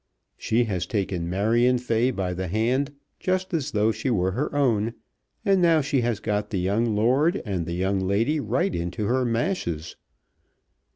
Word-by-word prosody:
She 115 +2 +1
has 95 -6 -2
taken 95 -5 -2
Marion 115 +7 +2
Fay 120 0 +1
by 95 -7 -2
the 95 +1 -3
hand 125 - 0 0.2
just 185 0 -1
as 150 -4 0
though 110 -4 +2
she 130 - -3
were 95 -5 +1
her 140 +9 -2
own, 115 -5 +1 0.5
and 195 -2 +3
now 165 -2 +4
she 140 -2 0
has 120 -3 -1
got 105 -1 -2
the 100 - -2
young 105 +5 +1
lord 135 - +2
and 90 -6 -2
the 85 - -3
young 95 +2 0
lady 110 +11 +1
right 175 +6 0
into 85 +5 -3
her 130 +4 +1
mashes. 115 - -2
115 Hz, 170 wpm, -25 LUFS, 95-135 Hz, 0.5 s, now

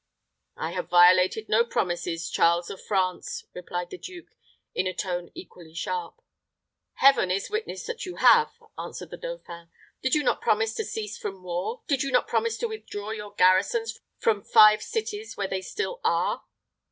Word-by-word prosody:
"I - - -3
have - - -4
violated 180 +4 +5
no 225 +2 +4
promises, 175 -6 -2
Charles 170 +1 +2
of 195 - -9
France," 185 -3 -1
replied 180 0 -5
the 370 - -7
duke, 360 -2 -10 0.4
in 185 - 0
a 185 - -3
tone 180 -2 -3
equally 165 -2 -12
sharp. 455 - -4 0.7
"Heaven 270 -8 +5
is 190 - -1
witness 435 +1 -3
that 475 -1 -5
you 365 -2 -6
have," 465 -1 +6 0.3
answered - - -7
the - - -7
dauphin. 335 - -8 0.3
"Did 260 +2 +2
you 300 - +2
not - - +1
promise 220 +1 +1
to - - -3
cease 215 0 -5
from 195 -3 -6
war? 180 - -4
Did 275 -3 +1
you 275 - -1
not 250 - +3
promise 460 -1 0
to 470 - -1
withdraw 215 - -6
your 210 -2 -6
garrisons 200 +5 +3 0.2
from 215 -3 +1
five 215 +1 +7
cities 440 -1 -4
where 200 - -1
they 190 0 -3
still 465 - -4
are?" - - 0
210 Hz, 170 wpm, -26 LUFS, -, 0.7 s, five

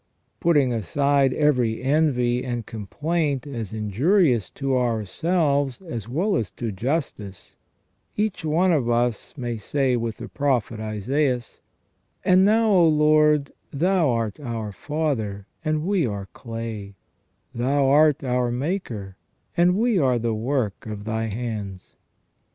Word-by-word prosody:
Putting 145 -7 +3
aside 140 - +2
every 125 -6 +1
envy 130 -4 +2
and 120 -3 -3
complaint 145 - -2
as 115 -8 -5
injurious 120 - +2
to 135 -1 -2
ourselves 135 - 0
as 120 - -7
well 185 - 0
as 110 - -2
to 115 -3 -4
justice, 105 - -4 0.6
each 210 -4 -1
one 165 +4 +2
of 135 -8 +1
us 120 -1 0
may 120 -3 -3
say 130 +4 0
with 115 -2 -3
the 115 - -7
Prophet 125 -6 -1
Isaias: 120 +4 -1 0.7
"And 185 +1 +5
now, 220 +2 +4
O 175 -4 +5
Lord, 150 -1 +4 0.2
Thou 175 +1 +2
art 115 +1 -1
our 115 -6 -4
Father, 110 - -2 0.2
and 155 0 -1
we 185 -7 +1
are 100 -2 -4
clay: 115 -3 -6 0.6
Thou 135 +4 +1
art 150 +1 +4
our 125 -1 0
Maker, 120 - -3 0.4
and 180 +2 +3
we 225 -3 +2
all 135 - +3
are 125 -1 +2
the 115 -1 -1
work 115 -2 -2
of 105 -1 -6
Thy 110 0 -1
hands". 105 -4 -5
125 Hz, 135 wpm, -24 LUFS, 115-155 Hz, 0.7 s, And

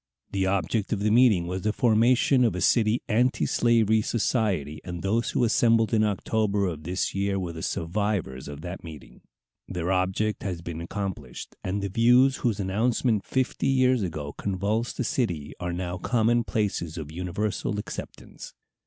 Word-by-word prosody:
The 95 -1 0
object 100 +2 -1
of 100 - -2
the 105 +1 +2
meeting 110 -7 +5
was 90 +2 -3
the 105 - +1
formation 120 +3 +3
of 115 -7 +2
a - - -2
city 110 +4 +3
antislavery 115 -2 +2
society, 100 - -1
and 90 -1 -6
those 110 +4 0
who - - 0
assembled 115 -1 +3
in 110 -1 +4
October 105 0 0
of 80 -5 -3
this 90 +3 -1
year 100 0 0
were 90 -3 -3
the 80 - -7
survivors 85 -8 -2
of 70 +1 -8
that 90 +3 -7
meeting. 80 -3 -11 0.5
Their 90 +1 -2
object 95 +3 0
has 90 -4 -4
been 85 -1 -5
accomplished, 95 +2 -6
and 100 +2 -2
the 100 - -2
views 125 +6 +4
whose 110 -4 -1
announcement 110 +2 +1
fifty 130 -1 -1
years 130 -2 +3
ago 80 -6 -4
convulsed 100 +4 -2
the - - 0
city 90 - -2
are 90 -1 -3
now 90 0 -4
common 120 +2 +2
places 90 -6 -2
of 75 -2 -6
universal 95 +4 -2
acceptance. 105 - -8
100 Hz, 160 wpm, -26 LUFS, 90-115 Hz, 0.5 s, meeting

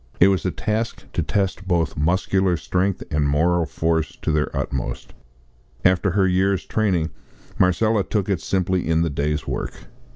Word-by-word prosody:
It 95 - +7
was 95 -2 +1
a 95 - +1
task 110 +4 -2
to - - 0
test 95 -1 -1
both 85 -3 +1
muscular 90 +3 +1
strength 90 +4 -1
and 75 -2 +1
moral 85 +3 +2
force 80 +3 -1
to - - +1
their 75 0 +1
utmost. 65 -2 -4 0.7
After 95 +2 +4
her 95 +1 +2
year's 95 +1 +1
training 90 -7 0 0.5
Marcella 105 +3 +3
took 100 -1 -1
it 95 -5 0
simply 95 -2 0
in 80 0 +3
the 85 - -1
day's 75 0 -1
work. - - -5
90 Hz, 160 wpm, -22 LUFS, 80-95 Hz, 0.7 s, It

